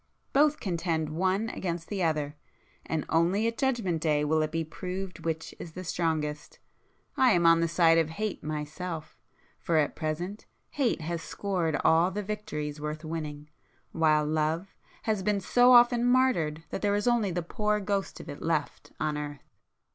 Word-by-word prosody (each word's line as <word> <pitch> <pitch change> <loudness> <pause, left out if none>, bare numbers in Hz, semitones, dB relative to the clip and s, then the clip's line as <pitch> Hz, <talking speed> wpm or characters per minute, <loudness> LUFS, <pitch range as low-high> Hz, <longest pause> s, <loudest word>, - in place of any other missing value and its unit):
Both 295 +2 +4
contend 165 -4 -1
one 190 +7 0
against 170 -5 -4
the 200 -2 -3
other,—and 155 0 -4
only 175 +6 +2
at 230 0 0
Judgment 230 - 0
Day 150 -2 +2
will 155 +1 +2
it 155 0 -1
be 165 0 -1
proved 185 +3 -6
which 160 -1 -3
is 165 - -8
the 185 - -6
strongest. 155 -4 -2 0.6
I 255 -3 +5
am 170 -1 +2
on 165 0 +7
the 165 - +2
side 165 0 +4
of 160 -1 +1
Hate 210 +5 -4
myself,—for 155 +2 -5
at 150 -2 +1
present 175 +6 -4 0.2
Hate 260 - 0
has 165 +1 -3
[p - - -10
355] 175 -7 0
scored - - -10
all 165 +3 +5
the 205 +2 -4
victories 150 -8 -4
worth 150 +1 -4
winning, 150 -2 -5 0.4
while 155 -2 +3
Love 155 +5 -1 0.3
has 215 -3 0
been 205 +1 +1
so 245 +6 +4
often 240 0 +6
martyred 245 -12 +2
that - - -3
there 205 -1 +2
is 205 +3 -1
only 235 -4 +3
the 175 -1 -2
poor 210 +4 0
ghost 200 -1 -2
of - - -10
it 145 -2 -8
left 160 -3 -2
on 150 -1 -1
earth." 145 -1 -8
165 Hz, 170 wpm, -28 LUFS, 155-200 Hz, 0.6 s, on